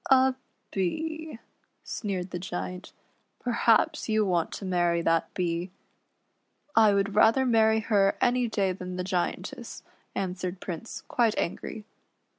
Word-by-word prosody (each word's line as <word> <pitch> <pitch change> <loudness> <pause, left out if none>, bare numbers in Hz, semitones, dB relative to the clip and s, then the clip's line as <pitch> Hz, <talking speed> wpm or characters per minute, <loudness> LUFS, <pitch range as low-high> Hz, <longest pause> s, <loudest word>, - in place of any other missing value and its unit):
" - - -7
A 265 0 +6 0.4
Bee," 315 - -2 0.5
sneered 190 -4 -4
the 175 - -3
Giant; 180 0 -5 0.3
" - - -45
perhaps 235 -2 +2
you 215 -1 +3
want 175 -3 +1
to 200 - -6
marry 175 -2 +1
that 165 -1 +1
Bee." 175 0 -1 0.6
" - - -47 0.2
I 220 -2 +7
would 200 0 +1
rather 225 +5 +5
marry 220 -2 +4
her 200 -3 +2
any 245 0 +2
day 200 -4 +1
than 180 0 -6
the 180 - -2
Giantess," 180 -1 -3 0.3
answered 180 -1 -3
Prince, 185 +5 -6
quite 230 -3 +2
angry. 210 +5 -3
195 Hz, 140 wpm, -28 LUFS, 180-225 Hz, 0.6 s, I